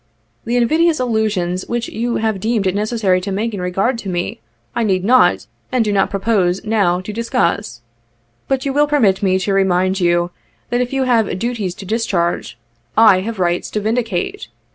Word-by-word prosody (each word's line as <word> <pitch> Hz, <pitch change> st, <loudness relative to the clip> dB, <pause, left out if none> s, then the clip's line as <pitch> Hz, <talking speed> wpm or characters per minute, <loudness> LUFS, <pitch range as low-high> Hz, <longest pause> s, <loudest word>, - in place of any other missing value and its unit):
The 235 Hz, -, -1 dB
invidious 315 Hz, +6 st, +2 dB
allusions 215 Hz, -7 st, -1 dB
which 240 Hz, 0 st, -2 dB
you 235 Hz, +2 st, -2 dB
have 220 Hz, -3 st, -1 dB
deemed 220 Hz, 0 st, 0 dB
it 185 Hz, -, +1 dB
necessary 205 Hz, -3 st, +1 dB
to 195 Hz, +2 st, -4 dB
make 215 Hz, +4 st, -2 dB
in 195 Hz, -, -4 dB
regard 195 Hz, +7 st, 0 dB
to 200 Hz, -, -6 dB
me, 175 Hz, -9 st, -3 dB, 0.3 s
I -, -, 0 dB
need 190 Hz, -3 st, 0 dB
not, 250 Hz, +3 st, +4 dB, 0.3 s
and 250 Hz, -3 st, +2 dB
do 210 Hz, -, 0 dB
not 195 Hz, -, +2 dB
propose, 195 Hz, -2 st, 0 dB
now, 200 Hz, -5 st, +1 dB
to 205 Hz, +3 st, -7 dB
discuss. 170 Hz, -, -1 dB, 0.7 s
But 270 Hz, 0 st, -1 dB
you 275 Hz, -, -1 dB
will 295 Hz, +1 st, +3 dB
permit 225 Hz, -11 st, +2 dB
me 190 Hz, -2 st, +2 dB
to 190 Hz, +1 st, -1 dB
remind 190 Hz, 0 st, +2 dB
you 175 Hz, 0 st, +1 dB, 0.4 s
that 245 Hz, -, +1 dB
if 250 Hz, -, -2 dB
you 270 Hz, -1 st, 0 dB
have 230 Hz, -7 st, +1 dB
duties 210 Hz, -4 st, -3 dB
to 195 Hz, -, -9 dB
discharge, 190 Hz, -, -1 dB, 0.4 s
I 215 Hz, -4 st, +7 dB
have 220 Hz, +3 st, -4 dB
rights 175 Hz, -1 st, 0 dB
to 215 Hz, -, -2 dB
vindicate. 215 Hz, -, -2 dB
210 Hz, 185 wpm, -18 LUFS, 185-235 Hz, 0.7 s, I